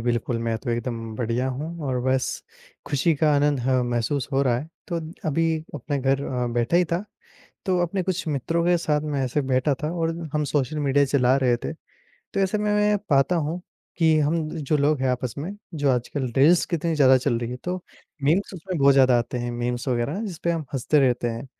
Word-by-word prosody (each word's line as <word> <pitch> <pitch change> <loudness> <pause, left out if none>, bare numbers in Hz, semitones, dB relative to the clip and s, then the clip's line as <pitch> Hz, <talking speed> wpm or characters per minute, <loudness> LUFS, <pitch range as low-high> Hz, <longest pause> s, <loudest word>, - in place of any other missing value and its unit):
बिल्कुल 120 0 -1
मैं 115 -1 0
तो 120 - -4
एकदम 115 -2 -3
बढ़िया 120 +2 -1
हूँ 155 +5 -5
और 130 -2 0
बस 130 0 +1 0.6
खुशी 150 +3 +2
का 150 +1 +2
आनंद 145 0 +2
ह 130 +1 +2
महसूस 120 +3 -1
हो 135 +1 +3
रहा 125 -3 +2
है, 150 +5 -7 0.2
तो 170 - -2 0.3
अभी 165 +3 +1 0.3
अपने 145 -1 -3
घर 135 +1 +1
अ, 125 -2 -2
बैठा 120 +7 +1
ही 180 - +4
था, 180 +5 0 0.6
तो 185 -2 +2
अपने 185 +2 -1
कुछ 185 -1 -2
मित्रों 155 +4 0
के 175 0 +4
साथ 150 -3 0
मैं 145 -3 -1
ऐसे 145 +4 0
बैठा 130 +2 +1
था 155 - -1
और 165 0 +1 0.2
हम 150 0 +1
सोशल 145 +1 -1
मीडिया 140 0 +3
चला 130 -2 +3
रहे 125 -3 +3
थे। - - -3 0.4
तो 195 - -6
ऐसे 195 +2 +1
में 210 0 0
मैं 210 0 +3
ये 210 - +3
पाता 140 +5 +3
हूँ, 160 +3 -2 0.4
कि 160 -2 +4
हम 155 +1 +1
जो 150 0 0
लोग 145 -1 +2
हैं 130 - +1
आपस 125 -2 -2
में 160 +7 -4 0.2
जो 145 -3 +1
आजकल 125 +1 -1
रील्स 160 +6 +5
कितनी 165 0 -1
ज़्यादा 130 -3 +6
चल 120 -2 0
रही 120 0 -4
है 125 - -4
तो 180 +1 -1 0.5
मीम्स 170 +8 +2
उसमें 185 0 -5
बहुत 140 0 +6
ज़्यादा 130 -2 +5
आते 120 +1 -3
हैं, 120 0 -3
मीम्स 120 +1 -3
वगैरह 125 - -1
जिसपे 170 -4 -3
हम 165 -2 -1
हँसते 140 +3 +2
रहते 125 -2 +2
हैं, 115 +3 -5
140 Hz, 215 wpm, -24 LUFS, 125-160 Hz, 0.6 s, ज़्यादा